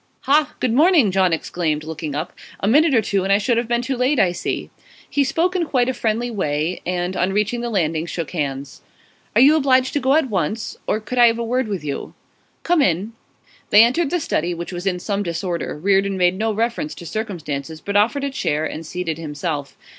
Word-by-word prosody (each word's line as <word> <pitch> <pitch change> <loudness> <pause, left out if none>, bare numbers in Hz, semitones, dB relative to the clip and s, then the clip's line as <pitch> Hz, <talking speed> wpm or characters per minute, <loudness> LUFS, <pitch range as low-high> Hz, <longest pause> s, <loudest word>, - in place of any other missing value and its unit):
'Ha! 290 +3 +2
Good 250 -3 0
morning!' 300 - +5
John 185 -1 +2
exclaimed, 160 -2 -1
looking 155 -2 -5
up. 155 +4 -4 0.3
'A 195 - -1
minute 295 +5 +4
or 225 - +3
two 195 -1 0
and 195 - 0
I 200 - +6
should 230 +3 +1
have 235 0 0
been 240 +1 0
too 265 +1 -2
late, 255 +3 +1
I 190 -4 +4
see.' 175 - -4 0.4
He 285 - +1
spoke 335 +7 0
in 345 -3 0
quite 250 -4 +1
a 260 - 0
friendly 235 +1 -1
way, 160 -4 -2
and, 180 +1 -2
on 185 +2 +1
reaching 210 +4 0
the 240 - -3
landing, 165 -6 0
shook 170 -2 -4
hands. 140 -4 -4 0.5
'Are 230 - +6
you 290 +4 +7
obliged 260 -3 +3
to 290 - +1
go 265 +1 +2
at 315 -3 +2
once? 195 +4 -2
Or 215 - +1
could 235 +4 -4
I 240 - +8
have 230 0 +2
a 235 - -2
word 250 +1 0
with 195 -7 -4
you?' 145 -2 -5 0.5
'Come 345 -3 +3
in.' 190 - 0 0.6
They 210 +2 +8
entered 275 +7 +2
the 355 - 0
study, 175 - -1
which 170 +2 -6
was 175 +2 -4
in 180 -2 +1
some 200 +3 -2
disorder; 170 -3 -3
Reardon 195 +3 +1
made 180 -1 +3
no 220 +3 0
reference 235 +8 -2
to 170 - -10
circumstances, 160 -7 -5
but 200 +4 -5
offered 235 +8 +2
a 280 - -1
chair, 155 - -1
and 160 +1 -5
seated 165 -1 -4
himself. 150 -2 -4
200 Hz, 220 wpm, -21 LUFS, 170-250 Hz, 0.6 s, I